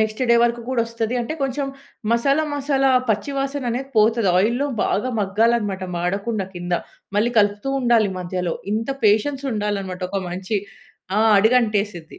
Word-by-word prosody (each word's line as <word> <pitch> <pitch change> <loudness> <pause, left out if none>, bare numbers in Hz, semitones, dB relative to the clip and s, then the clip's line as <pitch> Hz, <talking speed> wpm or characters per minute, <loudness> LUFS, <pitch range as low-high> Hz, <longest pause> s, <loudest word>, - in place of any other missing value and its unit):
Next 215 +1 -1
day - - +7
వరకు 235 0 +1
కూడా 255 -3 +1
వస్తది, 230 0 -3
అంటే 240 +7 -3
కొంచెం 275 +1 -1 0.5
మసాలా, 275 +6 +2
మసాలా 275 -1 +1 0.2
పచ్చి 215 +6 0
వాసన 275 0 -2
అనేది 260 +3 -3
పోతది. 220 -1 +4
ఆయిల్లో 235 +8 +1 0.2
బాగా 240 +6 0
మగ్గాలనమాట 205 -1 +1
మాడకుండా 200 +4 -1
కింద. 175 0 -5 0.4
మళ్ళీ 225 +4 +2
కలుపుతూ 205 +5 +1
ఉండాలి, 235 -4 +3
మధ్యలో. 180 -1 -3 0.2
ఇంత 225 +5 -1
పేషెన్స్ 240 +7 +2
ఉండాలనమాట 200 -3 -3
ఒక 195 0 -1
మంచి 190 +4 -2 0.6
ఆహ్, 220 0 +4
అడుగంటేసిద్ది. 210 -6 +1
220 Hz, 145 wpm, -21 LUFS, 200-245 Hz, 0.6 s, day